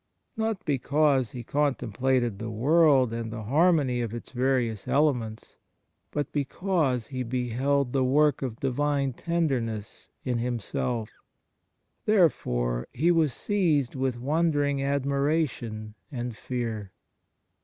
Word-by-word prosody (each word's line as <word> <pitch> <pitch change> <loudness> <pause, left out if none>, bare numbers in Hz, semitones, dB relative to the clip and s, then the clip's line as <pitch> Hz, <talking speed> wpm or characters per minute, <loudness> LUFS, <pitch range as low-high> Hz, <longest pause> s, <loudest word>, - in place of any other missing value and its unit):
Not 220 -3 -2
because 140 -2 +2
he 120 +1 -7
contemplated 125 -4 0
the 115 - -4
world 135 +1 +4
and 115 -1 -4
.the 110 -1 -5
harmony 145 - +3
of 115 -1 -3
its 120 - -8
various 125 -4 0
elements, 125 -7 0 0.5
but 145 -2 -3
because 145 - 0
he 130 +2 -5
beheld 125 +2 0
the 135 -1 +2
work 145 +3 +3
of 125 -4 -4
Divine 140 0 0
tenderness 125 -10 -2 0.2
in 125 -2 0
himself, 120 -1 -2 0.9
therefore - - +2
he 165 +7 +2
was 160 -4 +3
seized 160 -8 +1
with 130 -2 -1
wondering 145 +1 +1
admiration 140 -5 -1 0.2
and 120 -3 -4
fear." 110 -5 -4
130 Hz, 110 wpm, -27 LUFS, 120-145 Hz, 0.9 s, world